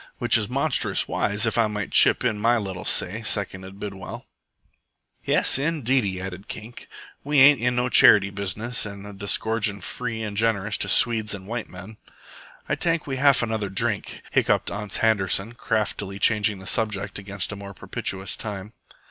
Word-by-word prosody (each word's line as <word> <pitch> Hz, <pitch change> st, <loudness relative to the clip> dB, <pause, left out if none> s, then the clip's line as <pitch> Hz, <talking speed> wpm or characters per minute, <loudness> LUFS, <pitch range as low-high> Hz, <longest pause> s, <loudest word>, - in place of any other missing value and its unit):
"Which -, -, +2 dB
is -, -, +1 dB
monstrous -, -, +1 dB
wise 105 Hz, +2 st, -1 dB
if 110 Hz, +1 st, 0 dB
I 115 Hz, -, +3 dB
might 105 Hz, -2 st, -5 dB
chip -, -, +5 dB
in 110 Hz, -4 st, 0 dB
my 120 Hz, +3 st, +2 dB
little 95 Hz, -4 st, -5 dB
say," 105 Hz, +6 st, +1 dB
seconded 95 Hz, -3 st, -2 dB
Bidwell. 100 Hz, -2 st, -8 dB, 1.0 s
"Yes, -, -, +2 dB
indeedy," 130 Hz, -, 0 dB
added 95 Hz, +2 st, -8 dB
Kink. 110 Hz, +2 st, -10 dB, 0.4 s
"We 145 Hz, 0 st, +2 dB
ain't 140 Hz, 0 st, +7 dB
in 125 Hz, +1 st, +1 dB
no 125 Hz, 0 st, 0 dB
charity 100 Hz, -4 st, +6 dB
business 105 Hz, +4 st, -3 dB
a 100 Hz, -, -8 dB, 0.2 s
disgorgin' 100 Hz, +1 st, 0 dB
free 115 Hz, +4 st, -5 dB
an' 105 Hz, -2 st, -5 dB
generous 105 Hz, -1 st, 0 dB
to -, -, 0 dB
Swedes 110 Hz, -3 st, +3 dB
an' 95 Hz, -1 st, -11 dB
white 115 Hz, +2 st, -5 dB
men." 100 Hz, +4 st, -11 dB, 0.7 s
"Ay -, -, -1 dB
tank 165 Hz, -2 st, 0 dB
we 135 Hz, -2 st, -4 dB
haf 140 Hz, -1 st, +4 dB
another 110 Hz, -3 st, -2 dB
drink," 95 Hz, -, -1 dB
hiccoughed -, -, +1 dB
Ans 105 Hz, -1 st, -4 dB
Handerson, 105 Hz, 0 st, +1 dB
craftily 105 Hz, -4 st, -2 dB
changing 105 Hz, -1 st, +1 dB
the 95 Hz, -, -12 dB
subject 105 Hz, -2 st, -2 dB
against 100 Hz, -1 st, -5 dB
a -, -, -5 dB
more 100 Hz, -1 st, -10 dB
propitious 95 Hz, +1 st, -4 dB
time. 105 Hz, 0 st, -6 dB
105 Hz, 165 wpm, -24 LUFS, 100-115 Hz, 1.0 s, ain't